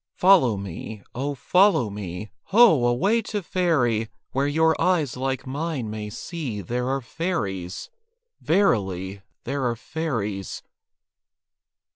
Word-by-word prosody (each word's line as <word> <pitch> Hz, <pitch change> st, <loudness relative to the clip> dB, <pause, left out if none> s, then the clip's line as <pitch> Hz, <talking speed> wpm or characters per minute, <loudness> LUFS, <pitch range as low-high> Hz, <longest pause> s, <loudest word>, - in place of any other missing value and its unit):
Follow 175 Hz, -, +5 dB
me, 100 Hz, +2 st, -7 dB
oh, 140 Hz, +3 st, -2 dB
follow 160 Hz, -, +3 dB
me! 100 Hz, 0 st, -6 dB
Ho! 195 Hz, -, +6 dB
away 195 Hz, -, +2 dB
to 210 Hz, -2 st, -4 dB
Faerie! 125 Hz, -12 st, +1 dB, 0.2 s
Where 135 Hz, +2 st, +1 dB
your 160 Hz, +2 st, +3 dB
eyes 165 Hz, -8 st, +2 dB
like 130 Hz, 0 st, -2 dB
mine 140 Hz, -4 st, -3 dB
may 105 Hz, -1 st, -5 dB
see 135 Hz, -, -5 dB
There 125 Hz, +6 st, -2 dB
are 135 Hz, 0 st, 0 dB
fairies. 105 Hz, -, -3 dB, 0.5 s
Verily, 100 Hz, -, +1 dB, 0.2 s
There 140 Hz, +2 st, -2 dB
are 120 Hz, -2 st, 0 dB
fairies. 115 Hz, -, -4 dB
130 Hz, 115 wpm, -24 LUFS, 105-165 Hz, 0.5 s, Ho